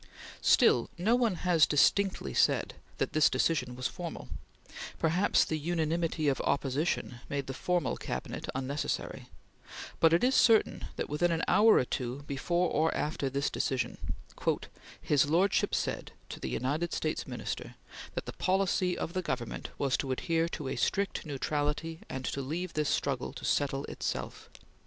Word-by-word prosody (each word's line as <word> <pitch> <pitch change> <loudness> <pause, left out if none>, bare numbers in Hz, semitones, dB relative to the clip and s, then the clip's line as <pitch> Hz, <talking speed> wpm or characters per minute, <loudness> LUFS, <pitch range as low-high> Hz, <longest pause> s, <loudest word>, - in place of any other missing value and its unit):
Still 120 - +4
no 200 +7 +2
one 235 -6 +2
has 170 -4 +5
distinctly 155 - +2
said - - +2 0.2
that - - -1
this 155 -1 +5
decision 125 -7 0
was 125 0 -6
formal; 175 -3 -7 0.7
perhaps 175 +5 +3
the 155 - -2
unanimity 165 0 0
of 140 - +1
opposition 140 -2 -1
made 140 -1 -2
the 135 - -5
formal 175 +5 0
Cabinet 65 - -5
unnecessary; 135 +3 -3 0.7
but 165 - +5
it 170 +5 +3
is 255 +2 +4
certain 225 -3 +4
that, - - -3
within 170 +4 +1
an 165 -1 0
hour 220 +1 +6
or - - +4
two 125 +2 -4
before 170 +6 0
or 160 +2 +2
after 150 -2 -1
this 140 +2 -1
decision, 130 -3 -1 1.0
"his 145 0 +2
lordship 180 +5 +2
said - - -3 0.2
[to - - -7
the - - -4
United 150 +7 -1
States 155 - -2
Minister] - - -5 0.4
that - - -3
the - - -6
policy 185 -1 +1
of 170 - -4
the 185 - 0
Government 130 -8 -4
was 135 -2 +1
to 135 - -3
adhere 165 +5 0
to 150 -5 -5
a 130 - -3
strict 200 -4 0
neutrality 150 +3 -2
and 130 -1 -4
to 140 - -2
leave 165 +6 -4
this 150 -1 0
struggle 135 -3 -1
to - - -7
settle 140 -1 0
itself." - - -5
155 Hz, 155 wpm, -30 LUFS, 135-175 Hz, 1.0 s, hour